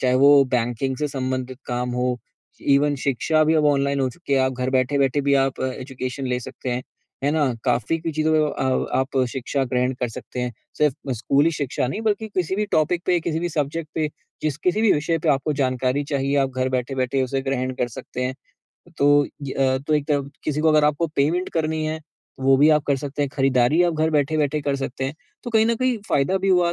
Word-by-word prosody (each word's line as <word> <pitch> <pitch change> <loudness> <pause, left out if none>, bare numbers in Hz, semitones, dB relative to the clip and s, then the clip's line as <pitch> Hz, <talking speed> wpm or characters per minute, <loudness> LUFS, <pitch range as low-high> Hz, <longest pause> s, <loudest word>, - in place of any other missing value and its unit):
चाहे 125 -1 +2
वो 140 +1 +6
बैंकिंग 120 +3 -1
से 150 +1 -1
संबंधित 130 -1 -3
काम 125 0 -2
हो, 125 -1 0 0.4
इवन 145 +1 +3
शिक्षा 155 +4 +2
भी 160 +1 +3
अब 155 -1 +3
ऑनलाइन 140 -1 +2
हो 130 - +1
चुकी 170 -1 -6
है। 135 - +4
आप 130 0 +1
घर 130 +1 -2
बैठ-बैठे 135 +1 +2
भी 140 0 +2
आप 135 - -4
एजुकेशन 130 0 -5
ले 125 0 -1
सकते 125 +1 -6
हैं। 125 +1 -2 0.4
है 145 - +3
ना? 150 -5 +1
काफ़ी 125 +5 +1
कुछ 165 -2 -4
चीज़ों 155 0 +2 0.2
अ, 130 -2 0
आप 130 +1 -2
शिक्षा 135 +2 -2
ग्रहण 125 +1 0
कर 125 - 0
सकते 125 +2 -7
हैं। 125 -1 -2 0.3
सिर्फ़ 145 -2 0
स्कूली 140 +7 +2
शिक्षा 140 -4 -2
नहीं, 205 - -3
बल्कि 220 0 0
किसी 185 0 0
भी 210 - +1
टॉपिक 170 +3 +2
पे 180 -1 +3
किसी 160 0 -2
भी 175 - -1
सब्जेक्ट 155 0 -2
पे, 155 -1 0 0.3
जिस 150 -3 -1
किसी 185 +4 +1
भी 220 - +5
विषय 160 +3 0
पे 160 0 -2
आपको 140 +1 +2
जानकारी 130 0 0
चाहिए, 140 +1 0
आप 135 -1 +2
घर 130 0 +1
बैठे-बैठे 130 +1 -1
उसे 135 +1 -1
ग्रहण 130 -1 -1
कर 120 - +1
सकते 125 - -5
हैं। 130 +1 -2 0.6
तो 145 0 +4 0.2
ये 135 - -4
अ, 130 -1 +2
तो 150 +3 -1
एक 150 -1 0
तरफ 140 -1 0
किसी 150 0 -1
को 160 - +3
अगर 155 -1 +4
आपको 150 +3 +2
पेमेंट 165 +6 +1
करनी 155 0 -1
है 155 +1 -2
तो 150 -3 -18
वो 135 0 +6
भी 150 +3 +5
आप 150 - +2
कर 140 -1 +2
सकते 145 +1 -3
हैं। 140 - 0
खरीदारी 135 +4 +3
आप 170 -2 +1
घर 160 +1 +1
बैठे-बैठे 150 0 +1
कर 140 -1 0
सकते 135 -1 -4
हैं। 135 +3 -3 0.3
तो 240 - -4
कहीं 220 -1 +4
न 230 - +2
कहीं 255 -2 0
फ़ायदा 145 +7 +2
भी 195 - -1
हुआ, 175 -2 +3
140 Hz, 220 wpm, -23 LUFS, 130-155 Hz, 0.6 s, वो